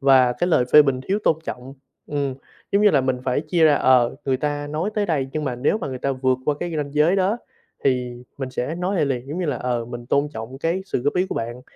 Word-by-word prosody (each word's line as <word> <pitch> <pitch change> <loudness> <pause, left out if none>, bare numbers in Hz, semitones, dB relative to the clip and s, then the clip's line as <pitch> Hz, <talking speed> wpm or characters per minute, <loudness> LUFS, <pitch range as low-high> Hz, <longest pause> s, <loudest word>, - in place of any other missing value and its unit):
và 130 -2 +5
cái 175 - -1
lời 130 -7 +3
phê 150 - +10
bình 135 -3 0
thiếu 200 - +2
tôn 160 - +4
trọng 130 0 -7 0.3
ừm, 140 -2 -2 0.4
giống 200 - +3
như 210 - +6
là 145 - +4
mình 130 -1 0
phải 130 +1 +1
chia 160 +2 +2
ra, 150 -2 +6
ờ, 130 -2 +3
người 135 -2 +1
ta 145 +1 -2
nói 155 +7 -2
tới 210 -1 0
đây, 145 -7 0
nhưng 155 -1 -2
mà 130 -3 -2
nếu 140 - +1
mà 145 - -4
người 130 -1 -5
ta 140 +1 -1
vượt 130 0 +1
qua 150 - +1
cái 175 -1 -3
ranh 145 -2 -3
giới 155 +5 +4
đó 195 +4 +1 0.5
thì 125 -2 0 0.2
mình 135 -2 -4
sẽ 130 +5 -3
nói 180 +3 -2
lại - - +3
liền. 130 -2 -2
Giống 155 +5 -4
như 180 - -1
là, 145 - -1
ờ, 120 -2 -2
mình 120 0 -8
tôn 140 +3 +1
trọng 115 +3 -7
cái 170 +5 -1
sự 125 - -2
góp 145 - 0
ý 180 +1 +2
của - - -4
bạn, 120 +2 -4
140 Hz, 270 wpm, -22 LUFS, 130-160 Hz, 0.5 s, phê